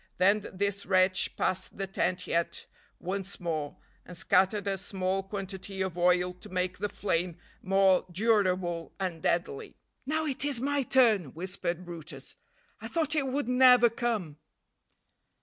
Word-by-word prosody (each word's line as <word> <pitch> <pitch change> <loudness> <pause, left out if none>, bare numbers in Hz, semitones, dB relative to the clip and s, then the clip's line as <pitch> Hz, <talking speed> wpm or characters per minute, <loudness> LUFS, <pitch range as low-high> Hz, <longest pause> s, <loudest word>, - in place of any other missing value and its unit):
Then 200 +3 +3
this 200 0 -2
wretch 185 -1 +3
passed 185 0 -2
the 195 - -2
tent 180 -1 -1
yet 170 0 -1 0.3
once 195 +2 -4
more, 155 -4 -3 0.3
and 180 - -11
scattered 195 +3 +2
a 195 - +1
small 190 0 -2
quantity 195 0 -6
of 185 -3 -4
oil 180 0 +2
to 180 +4 -14
make 185 -1 -2
the 205 - -1
flame 175 -4 -1 0.2
more 190 -1 +3
durable 185 -4 +1
and 180 -4 -3
deadly. 170 -5 -1 0.3
"Now 315 +2 0
it 275 -3 -1
is 285 -4 0
my 285 +2 0
turn," 225 - +3
whispered 180 0 -4
brutus. 170 -3 -8 0.4
"I - - -7
thought 315 -3 0
it 290 -4 +1
would 265 -1 -1
never 250 -2 +6
come." 220 -11 -2
190 Hz, 145 wpm, -29 LUFS, 180-215 Hz, 0.4 s, never